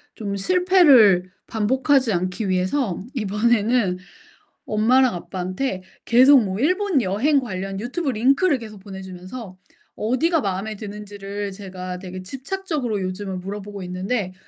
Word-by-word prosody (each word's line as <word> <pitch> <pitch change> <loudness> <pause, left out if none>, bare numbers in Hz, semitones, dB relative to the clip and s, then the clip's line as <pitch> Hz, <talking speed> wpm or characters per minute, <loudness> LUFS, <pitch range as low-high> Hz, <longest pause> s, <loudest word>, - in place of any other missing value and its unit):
좀 200 -2 -4
실패를 275 - +5 0.2
반복하지 260 +2 +2
않기 185 +4 -2
위해서 185 +3 0
이번에는 215 -2 +1 0.7
엄마랑 245 +4 +3
아빠한테 185 +4 -4 0.2
계속 260 +3 +7
뭐 190 0 -3
일본 365 - +2
여행 235 +9 +2
관련 195 -4 -5
유튜브 280 +6 -2
링크를 275 - +2
계속 215 -3 -10
보내 190 -1 -9
주면서 185 +2 -9 0.4
어디가 305 +10 +1
마음에 200 +1 -3
드는지를 205 -1 -6
제가 185 -2 -7
되게 185 0 -8
집착적으로 270 - -3
요즘은 185 0 -4
물어보고 200 +1 -7
있는데 185 +2 -3
210 Hz, 310 characters per minute, -22 LUFS, 190-260 Hz, 0.7 s, 계속